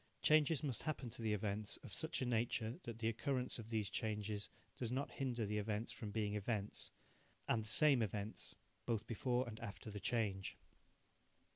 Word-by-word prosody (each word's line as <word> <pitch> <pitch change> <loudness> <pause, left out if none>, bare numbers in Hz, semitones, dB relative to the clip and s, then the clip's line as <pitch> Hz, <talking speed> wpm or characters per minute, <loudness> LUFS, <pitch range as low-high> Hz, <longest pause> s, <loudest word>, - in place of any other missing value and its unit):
Changes 155 -1 +5
must 135 -6 0
happen 140 -6 -2
to 120 - -7
the 110 -1 +1
events 105 0 0
of - - -8
such - - 0
a - - +1
nature 115 0 +1
that 115 -2 -4
the 115 -1 0
occurrence 125 +2 0
of 110 -1 -7
these 110 -3 +1
changes 105 0 -1 0.3
does 120 -2 -2
not 135 +3 0
hinder 125 -4 0
the 105 +1 0
events 105 +2 -1
from 110 - -5
being 105 -1 0
events, 105 0 -1 0.6
and 115 - +3
the - - -4
same 135 +3 +6
events, 105 0 -3 0.3
both 115 -2 +1
before 125 +2 +1
and 110 -1 -6
after 110 -1 -6
the 105 - -4
change. 100 -4 0
110 Hz, 175 wpm, -41 LUFS, 105-125 Hz, 0.6 s, same